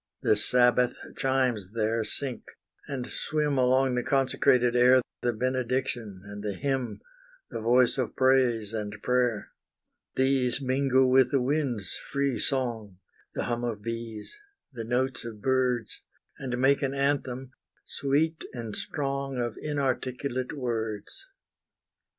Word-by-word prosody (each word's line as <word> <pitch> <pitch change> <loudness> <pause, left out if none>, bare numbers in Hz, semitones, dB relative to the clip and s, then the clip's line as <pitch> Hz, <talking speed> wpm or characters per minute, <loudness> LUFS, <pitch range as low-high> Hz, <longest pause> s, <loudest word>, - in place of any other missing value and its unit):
The - - +4
Sabbath 125 +3 +4 0.2
chimes 125 -7 0
there 115 0 0
sink 125 +3 -2 0.5
and 130 -3 -3
swim 150 0 -1
Along 130 +1 +3
the 125 - +1
consecrated 125 -2 +3
air, 125 +1 +6 0.2
The 120 - +1
benediction 125 -4 -2
and 105 0 -8
the 105 -1 -2
hymn, 135 -1 -2 0.5
The - - -4
voice 125 +2 +4
of 125 -4 -2
praise 125 -5 +3
and 105 -1 -3
prayer: 125 -4 +1 0.6
These 130 -1 +2
mingle 130 0 +3
with 130 0 +5
the 135 - +2
wind's 125 - -1
free 140 -2 -2
song, 115 -8 -1 0.4
The - - -1
hum 120 0 -2
of 110 -4 -3
bees, 115 - -4 0.3
the 115 -2 -5
notes 130 +2 0
of 115 -3 -7
birds, 125 -1 0 0.4
And 125 -2 -3
make 135 +2 +3
an 135 -1 -1
anthem 135 -2 -1 0.3
sweet 155 +4 0
and 115 -4 -5
strong 140 -2 -2
Of 120 -2 -2
inarticulate 130 -3 -2
words. 115 - -4
125 Hz, 125 wpm, -28 LUFS, 115-135 Hz, 0.6 s, air